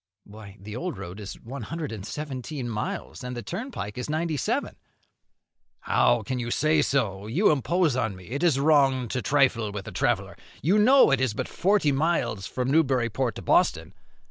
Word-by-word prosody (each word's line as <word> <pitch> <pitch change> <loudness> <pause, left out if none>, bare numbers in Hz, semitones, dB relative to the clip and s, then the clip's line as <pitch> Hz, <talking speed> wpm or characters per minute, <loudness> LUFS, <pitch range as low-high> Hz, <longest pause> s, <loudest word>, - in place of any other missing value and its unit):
"Why, 105 -1 -12
the 105 +2 -8
old 175 +5 -4
road 90 +4 -8
is 100 -1 -8
one 130 +4 -8
hundred 155 +4 -5
and 105 -4 -6
seventeen 135 +1 -5
miles, 115 +4 -4
and 125 0 -5
the 120 - -5
turnpike 175 - -5
is 125 - -5
ninety 160 +1 -1
seven." 135 - -1 1.1
"How - - +2
can 130 -1 -3
you 120 -1 -3
say 155 +4 +2
so? 105 -9 -1
you 165 - +3
impose 155 +1 +1
on 110 -6 -1
me; 90 +1 -13
it 140 - -2
is 165 -6 +3
wrong 135 -4 +3
to 125 - -2
trifle 125 -7 +2
with 100 -1 -6
a - - -6
traveller; - - -1 0.3
you 190 +8 +3
know 255 - +6
it 135 -2 +2
is 125 -5 0
but - - -3
forty 190 -5 +2
miles 140 - 0
from 125 +1 -2
Newburyport 130 -6 +1
to - - -8
Boston." - - +2
130 Hz, 185 wpm, -26 LUFS, 110-155 Hz, 1.1 s, know